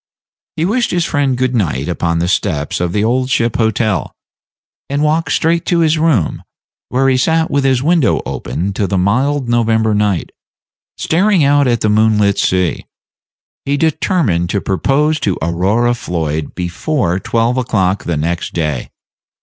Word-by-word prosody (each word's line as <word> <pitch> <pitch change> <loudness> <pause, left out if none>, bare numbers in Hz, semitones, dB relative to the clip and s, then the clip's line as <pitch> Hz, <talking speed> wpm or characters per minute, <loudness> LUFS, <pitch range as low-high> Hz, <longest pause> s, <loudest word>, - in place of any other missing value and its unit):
He 160 - -1
wished 235 +6 0
his 175 -2 0
friend 140 -5 0
good 130 0 0
night 85 - -1
upon 85 -1 -1
the 85 +1 0
steps 75 -5 -1
of 85 -1 -1
the 105 +3 0
Old 125 +3 0
Ship 115 -3 0
Hotel, 110 -2 0 0.8
and 140 +2 -1
walked 155 +2 0
straight 165 +1 +1
to 170 -1 +2
his 160 -1 +2
room, 150 - +1 0.5
where 135 +2 +1
he 130 -1 +3
sat 160 +4 +1
with 140 0 +1
his 130 -1 +2
window 165 -3 +2
open 95 +3 -4
to 100 0 -1
the 95 - -1
mild 130 +8 +1
November 110 -2 +1
night, 105 -4 0 0.7
staring 185 +1 +2
out 140 0 +3
at 120 -2 +1
the - - +1
moonlit 105 -1 +2
sea. 90 -2 0 0.8
He 140 +1 -1
determined 145 - 0
to 100 - 0
propose 145 +11 0
to 95 -7 -1
Aurora 95 +9 +1
Floyd 80 -9 -3
before 90 - -1
twelve 115 +4 0
o'clock 100 -6 0
the 85 -3 -1
next 85 +3 -2
day. 75 -6 -2
115 Hz, 160 wpm, -15 LUFS, 90-145 Hz, 0.8 s, he